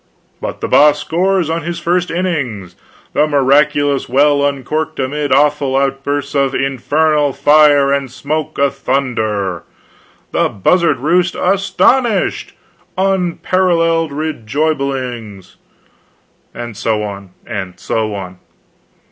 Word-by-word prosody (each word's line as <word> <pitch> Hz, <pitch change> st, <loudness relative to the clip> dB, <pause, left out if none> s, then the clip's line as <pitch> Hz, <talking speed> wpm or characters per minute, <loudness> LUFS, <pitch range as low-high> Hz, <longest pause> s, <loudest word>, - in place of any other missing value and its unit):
But -, -, -5 dB
the -, -, -2 dB
Boss 150 Hz, 0 st, +5 dB
scores 185 Hz, +2 st, 0 dB
on 165 Hz, +1 st, -2 dB
his 170 Hz, +2 st, -4 dB
first 175 Hz, +1 st, 0 dB
Innings! 135 Hz, -, -3 dB, 0.4 s
The 150 Hz, -, +2 dB
Miraculous 145 Hz, 0 st, +2 dB
Well 140 Hz, +2 st, +3 dB
Uncorked 145 Hz, +3 st, -2 dB
amid 145 Hz, +2 st, -2 dB
awful 140 Hz, -1 st, +2 dB
outbursts 140 Hz, +1 st, -1 dB
of 140 Hz, -1 st, +1 dB
INFERNAL 145 Hz, +2 st, +1 dB
FIRE 145 Hz, 0 st, +4 dB
AND 140 Hz, -2 st, -1 dB
SMOKE 145 Hz, +4 st, -4 dB
ATHUNDER! 125 Hz, -9 st, -1 dB, 0.7 s
THE -, -, +1 dB
BUZZARD 160 Hz, -, +2 dB
ROOST 175 Hz, +5 st, +1 dB
ASTONISHED! 200 Hz, +4 st, +1 dB, 0.4 s
UNPARALLELED 175 Hz, -3 st, +1 dB
REJOIBINGS! 135 Hz, -, -3 dB, 0.9 s
and 120 Hz, -2 st, -7 dB
so 110 Hz, +1 st, -1 dB
on, 100 Hz, -2 st, -7 dB, 0.2 s
and 100 Hz, -6 st, -6 dB
so 110 Hz, -2 st, -2 dB
on. 95 Hz, -2 st, -8 dB
145 Hz, 105 wpm, -15 LUFS, 125-160 Hz, 0.9 s, Boss